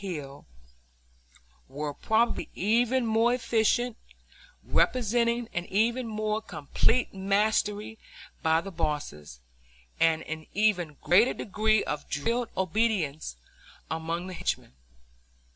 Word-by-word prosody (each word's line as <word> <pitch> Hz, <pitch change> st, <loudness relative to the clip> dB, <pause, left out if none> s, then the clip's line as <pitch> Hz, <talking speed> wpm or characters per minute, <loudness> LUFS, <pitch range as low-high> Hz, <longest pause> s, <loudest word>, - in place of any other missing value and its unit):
Hill, 150 Hz, -8 st, -6 dB, 1.2 s
were 145 Hz, +2 st, -4 dB
probably 225 Hz, +8 st, +1 dB
even 240 Hz, +5 st, +2 dB
more 225 Hz, +2 st, +3 dB
efficient, 235 Hz, 0 st, +1 dB, 0.7 s
representing 235 Hz, 0 st, +1 dB
an 175 Hz, 0 st, -2 dB
even 230 Hz, +5 st, +1 dB
more 215 Hz, 0 st, -1 dB
complete 220 Hz, -, 0 dB
mastery 205 Hz, +2 st, 0 dB, 0.4 s
by 160 Hz, 0 st, +3 dB
the 195 Hz, -, -7 dB
bosses, 145 Hz, -, -4 dB, 0.6 s
and 160 Hz, -1 st, +3 dB
an 160 Hz, 0 st, -6 dB
even 180 Hz, -8 st, +1 dB
greater 215 Hz, +8 st, +4 dB
degree 215 Hz, 0 st, +1 dB
of 150 Hz, 0 st, -4 dB
drilled 230 Hz, -, -1 dB
obedience 185 Hz, -, 0 dB, 0.6 s
among 165 Hz, +2 st, -2 dB
the 185 Hz, -, -6 dB
henchmen. 60 Hz, -, -3 dB
205 Hz, 100 wpm, -28 LUFS, 160-225 Hz, 1.2 s, greater